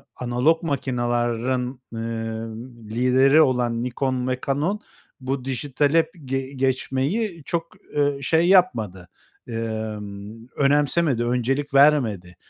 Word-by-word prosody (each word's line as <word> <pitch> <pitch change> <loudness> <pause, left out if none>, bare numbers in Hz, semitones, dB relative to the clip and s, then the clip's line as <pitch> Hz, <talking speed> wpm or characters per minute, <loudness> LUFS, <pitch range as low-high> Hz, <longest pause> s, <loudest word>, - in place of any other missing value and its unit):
analog 125 +7 +1
makinaların, 125 -2 -1
ııı, 115 0 -4 0.3
lideri 130 +6 +4
olan 120 -4 +1
Nikon 125 0 -1
ve 130 0 -1
Canon 155 +10 0 0.4
bu 130 0 -3
dijitale 145 +4 +1
ge 135 +1 -1
geçmeyi 135 - -1
çok, 170 -1 -3 0.2
ııı, 145 -1 +1
şey 165 +5 +3
yapmadı, 110 - +2 0.4
ımm, 110 -1 -5
önemsemedi, 145 -2 +2
öncelik 130 +4 -1
vermedi, 120 -11 +3
130 Hz, 95 wpm, -23 LUFS, 115-145 Hz, 0.4 s, lideri